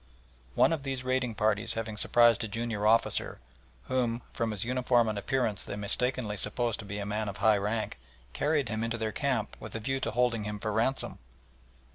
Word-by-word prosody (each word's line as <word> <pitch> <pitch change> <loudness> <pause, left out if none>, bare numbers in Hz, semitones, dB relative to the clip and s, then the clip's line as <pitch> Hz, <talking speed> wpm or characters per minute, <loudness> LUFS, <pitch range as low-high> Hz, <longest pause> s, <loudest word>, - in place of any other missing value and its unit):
One - - +5
of 160 - -2
these 135 -2 -3
raiding 130 -2 0
parties 110 0 +1
having 110 -1 -3
surprised 120 +1 +4
a - - -2
junior 110 -1 -1
officer, 115 +1 +2 0.4
whom 120 - -1
from 115 - -1
his 105 -3 -2
uniform 125 -1 +2
and 110 - -1
appearance 110 0 0
they - - -5
mistakenly 105 +1 0
supposed 115 +3 -1
to 110 - -7
be 100 0 -5
a 100 - -3
man 105 +1 -2
of 100 - -7
high 105 0 +4
rank, 105 - -2 0.3
carried 145 -3 +1
him 110 0 -2
into 115 0 -1
their 110 -1 -2
camp 130 -2 -1
with - - -8
a - - -2
view 135 +4 -1
to 120 - -1
holding 115 -1 +1
him 105 0 -4
for 110 +1 -3
ransom. 115 +5 0
115 Hz, 195 wpm, -30 LUFS, 105-125 Hz, 0.4 s, One